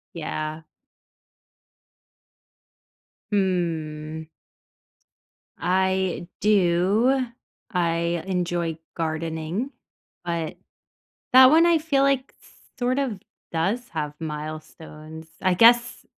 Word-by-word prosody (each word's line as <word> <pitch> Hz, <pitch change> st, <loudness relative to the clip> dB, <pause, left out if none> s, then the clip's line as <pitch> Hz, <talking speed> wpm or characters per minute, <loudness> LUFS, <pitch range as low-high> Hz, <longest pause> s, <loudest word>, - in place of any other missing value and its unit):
Yeah. 155 Hz, -1 st, -4 dB, 2.7 s
Hmm. 160 Hz, -5 st, -1 dB, 1.3 s
I 185 Hz, 0 st, 0 dB
do. 210 Hz, +6 st, +3 dB, 0.5 s
I 170 Hz, -2 st, 0 dB
enjoy 175 Hz, -3 st, -1 dB, 0.2 s
gardening, 165 Hz, -, -3 dB, 0.5 s
but 170 Hz, -2 st, -3 dB, 0.8 s
that 260 Hz, 0 st, +9 dB
one 330 Hz, +3 st, +6 dB
I 340 Hz, -1 st, +4 dB
feel 300 Hz, -3 st, +1 dB
like, 275 Hz, -1 st, +1 dB, 0.5 s
sort 255 Hz, +2 st, 0 dB
of, 245 Hz, -8 st, -1 dB, 0.3 s
does 200 Hz, +9 st, -1 dB
have 150 Hz, -2 st, -3 dB
milestones, 155 Hz, 0 st, -8 dB, 0.2 s
I 185 Hz, -1 st, +3 dB
guess, 240 Hz, +4 st, +5 dB
175 Hz, 75 wpm, -24 LUFS, 160-235 Hz, 2.7 s, that